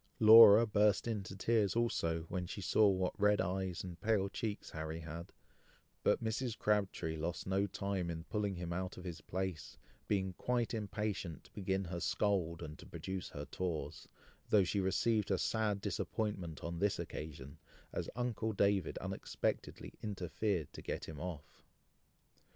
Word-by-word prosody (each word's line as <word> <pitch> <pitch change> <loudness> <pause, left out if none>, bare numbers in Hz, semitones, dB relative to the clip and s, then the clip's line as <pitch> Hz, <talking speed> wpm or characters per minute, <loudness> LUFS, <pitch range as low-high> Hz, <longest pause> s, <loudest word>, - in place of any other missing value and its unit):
Laura 110 0 +10
burst 105 0 +3
into 100 -4 -3
tears 105 -1 +2
also, 85 -9 +1
when 90 +2 -4
she 100 - -6
saw 105 +3 +4
what 95 -1 0
red 105 0 +5
eyes 95 -1 -1
and 90 -2 -8
pale 105 -3 +2
cheeks 105 -1 -4
Harry 80 +1 -4
had; 80 +2 -7 0.7
but - - +2
Mrs. 115 +1 -1
Crabtree 100 -6 0
lost 85 +2 -3
no 95 +1 +1
time 100 -2 -2
in 80 -1 -4
pulling 100 +1 -2
him 85 -1 -4
out 95 +1 -3
of 90 - -8
his 85 -3 -6
place, 95 -3 -4 0.3
being 95 -2 0
quite 120 +5 -1
impatient 105 -6 -3
to - - -21
begin 95 -1 -1
her 85 0 -4
scold, 85 -4 0
and 75 -1 -8
to - - -11
produce 95 -1 -5
her 75 0 -6
tawse, 80 -5 -4 0.4
though 105 -2 +6
she 95 +3 0
received 105 +2 +1
a 95 - +2
sad 105 -1 0
disappointment 100 -4 -3
on 85 0 -4
this 100 +1 +2
occasion, 70 -3 -7 0.3
as - - -3
uncle 115 -2 -1
David 100 -3 +2
unexpectedly - - -3
interfered 95 -3 -2
to - - -8
get - - -4
him 80 -3 -8
off. 80 -4 -7
95 Hz, 155 wpm, -35 LUFS, 85-105 Hz, 0.7 s, Laura